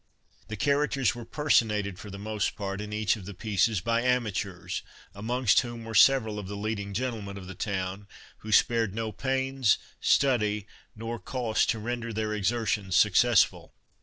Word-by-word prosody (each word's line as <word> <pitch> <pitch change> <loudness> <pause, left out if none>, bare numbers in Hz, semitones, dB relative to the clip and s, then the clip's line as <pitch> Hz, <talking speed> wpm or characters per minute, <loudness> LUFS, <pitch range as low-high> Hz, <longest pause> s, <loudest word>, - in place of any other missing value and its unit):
The 110 - -6
characters 140 -2 +1
were 120 -1 -8
personated 105 -9 +1
for 105 - -9
the 100 - -8
most 105 0 -2
part 100 -1 -4
in 105 0 -6
each 105 0 +1
of 95 - -10
the 100 0 -8
pieces 105 0 +1
by 115 +3 +1
amateurs, 110 -7 -1 0.3
amongst 115 +2 +2
whom 120 -2 -5
were 115 - -6
several 110 -1 +5
of 100 - -7
the 100 - -5
leading 100 -1 -3
gentlemen 110 -4 -3
of 95 - -9
the 95 - -8
town, 95 0 -4 0.3
who 110 - -8
spared 115 -2 +3
no 110 -1 -2
pains, 130 0 +1 0.2
study, 105 -7 +2 0.3
nor 115 +1 -5
cost 125 -3 0
to - - +1
render 115 +1 -4
their 110 -1 -2
exertions 105 -2 0
successful. 110 +2 +3
110 Hz, 165 wpm, -28 LUFS, 100-120 Hz, 0.3 s, several